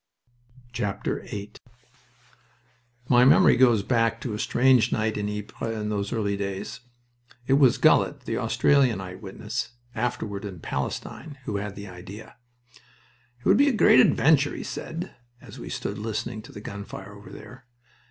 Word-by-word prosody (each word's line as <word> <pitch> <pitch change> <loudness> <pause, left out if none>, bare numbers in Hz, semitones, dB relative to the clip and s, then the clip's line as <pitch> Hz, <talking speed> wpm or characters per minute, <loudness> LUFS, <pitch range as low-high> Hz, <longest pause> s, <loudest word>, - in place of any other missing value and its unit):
VIII 105 -1 -4 1.6
My 125 -1 +5
memory 130 - +6
goes 120 -5 +4
back 115 -1 +1
to 120 - -4
a 105 - -4
strange 130 0 +3
night 110 0 0
in 105 0 -2
Ypres 105 +2 -5
in 105 0 -3
those 100 -1 -2
early 105 -4 -1
days. 100 -1 -5 0.7
It 135 - +2
was 135 -3 +5
Gullett, - - +3
the - - -4
Australian 130 -8 +3
eyewitness, 95 +5 -6 0.2
afterward 110 -3 -3
in 95 -4 -7
Palestine, 110 - -5
who 105 - -2
had 100 0 -5
the 100 +1 -8
idea. 95 +4 -11 1.0
"It - - -22
would - - +5
be 285 +1 +5
a - - 0
great 215 - +6
adventure," 145 +2 +4
he - - -5
said, 165 +2 -6 0.3
as - - -12
we - - -7
stood 100 +1 -4
listening 110 +1 -4
to - - -13
the 105 - -9
gun 100 -1 -7
fire 100 0 -9
over 105 0 -13
there. 125 0 -12
110 Hz, 150 wpm, -25 LUFS, 100-125 Hz, 1.6 s, memory